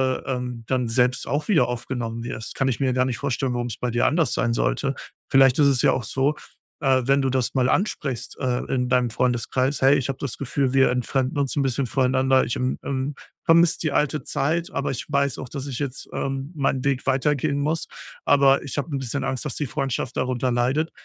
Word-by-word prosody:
ähm, 125 -3 -4
dann 125 -2 0
selbst 125 +2 +1
auch 145 +5 -1
wieder 155 - +4
aufgenommen 120 -1 -4
wirst. 115 -1 -6
Kann 130 - 0
ich 130 - -1
mir 130 -2 +1
gar 130 0 +2
nicht 125 -2 -2
vorstellen, 135 -2 -1
warum's 120 -2 -3
bei 125 - -2
dir 120 - +1
anders 160 +1 +1
sein 120 - +1
sollte. - - 0 0.3
Vielleicht 135 0 +5
ist 145 - +6
es 135 -3 +3
ja - - +5
auch 130 - -1
so, 135 +4 0 0.5
äh, 130 -2 +3
wenn 140 +1 +4
du 135 - +1
das 130 0 -1
mal 130 -1 +2
ansprichst, 135 - -2
äh, 125 -2 -1
in 125 -1 0
deinem 125 -1 +2
Freundeskreis: 125 +3 0
„Hey, 135 +2 +6
ich 135 -2 -1
habe 135 -1 -3
das 140 -4 -4
Gefühl, 135 -1 -1
wir 135 -2 +4
entfremden 130 +2 -1
uns 140 0 -1
'n - - +3
bisschen 130 -1 0
voneinander. 130 +1 +2
Ich, 120 - -2
ähm, 125 0 -1
ähm, 135 +1 -2 0.3
vermisse 165 0 +4
die 155 - -1
alte 150 +1 0
Zeit, 165 +5 -1
aber 140 - -2
ich 130 +2 -4
weiß 140 -2 +1
auch, 130 - -7
dass 140 0 -5
ich 130 -1 -4
jetzt, 140 -2 -4
ähm, 135 +2 -3
meinen 135 -2 0
Weg 140 -1 0
weitergehen 140 +2 +1
muss, 155 +3 -1 0.4
aber 140 -1 +5
ich 140 - -6
habe 145 - -2
'n - - -1
bisschen 135 +1 -3
Angst, 130 -3 -2
dass - - -3
die 150 - -2
Freundschaft 135 -2 -3
darunter 125 0 0
leidet.“ 130 +7 +1
130 Hz, 215 wpm, -23 LUFS, 125-140 Hz, 0.5 s, ist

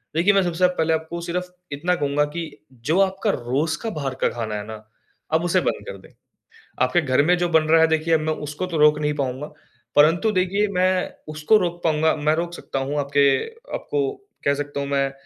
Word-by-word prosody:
देखिए, 180 +5 +4
मैं 195 - +4
सबसे 175 0 -2
आप 180 - +3
पहले 160 0 +2
आपको 160 +2 -3
सिर्फ़ 180 +1 -3 0.2
इतना 175 +5 0
कहूँगा 145 0 +1
कि 170 -1 -2 0.4
जो 175 +5 +3
आपका 195 +2 0
रोज 140 +6 -1
का 225 - -1
बाहर 140 -9 -4
का - - +4
खाना 110 -3 -4
है 105 - -5
ना, 110 - -6 0.6
आप 160 - +3
उसे 180 +1 +2
बंद - - -2
कर - - -7
दें। - - -17 0.7
आपके 175 - +3
घर 130 -1 +2
में 180 +1 +4
जो 175 0 0
बन 160 -2 +4
रहा 165 0 +6
है 160 - +6
देखिए 160 +1 +1
अब 160 - +2
मैं 155 0 -1
उसको 150 +5 -5
तो 175 -2 -4
रोक 150 0 +5
नहीं 150 0 0
पाउँगा, 135 0 -3 0.5
परंतु 170 +9 +4
देखिए 195 +2 +1
मैं 185 0 +1 0.2
उसको 155 +8 +3
रोक 175 -2 -3
पाउँगा 160 0 +2
मैं 150 +1 +1
रोक 170 +1 -3
सकता 135 - -5
हूँ 140 +2 -2
आपके 140 0 +2 0.5
आपको 425 -2 -1 0.4
कह 140 - +3
सकता 145 0 -4
हूँ 140 - -3
मैं, 140 -1 0
160 Hz, 215 wpm, -22 LUFS, 145-180 Hz, 0.7 s, रहा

